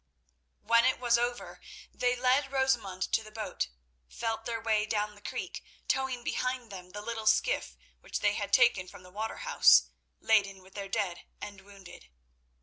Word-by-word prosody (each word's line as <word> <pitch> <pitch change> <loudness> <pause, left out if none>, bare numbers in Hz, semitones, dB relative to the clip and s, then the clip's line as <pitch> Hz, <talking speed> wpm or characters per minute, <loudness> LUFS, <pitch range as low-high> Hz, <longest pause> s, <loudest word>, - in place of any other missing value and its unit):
When 230 0 +5
it 260 - +2
was 240 -1 +3
over 240 0 -3 0.3
they 250 0 +1
led 255 +3 +2
Rosamund 240 -9 +1
to - - +3
the 215 - -11
boat, 215 - -3 0.4
felt 225 -1 -3
their 230 -1 -2
way 220 -1 +1
down 210 -1 -1
the 205 - -17
creek, - - -5 0.2
towing 265 -2 0
behind 255 -3 -2
them 180 -2 -9
the 205 +2 -8
little 220 -1 -4
skiff 220 - +2 0.2
which - - -5
they 205 0 +3
had 205 -1 -3
taken 235 -7 +4
from 180 - -13
the 180 - -15
water 215 +3 -4
house—laden 205 - +3
with 190 +1 -18
their 200 -1 -6
dead 195 -5 -2
and 200 -2 -8
wounded. 195 - -14
220 Hz, 165 wpm, -30 LUFS, 200-245 Hz, 0.4 s, When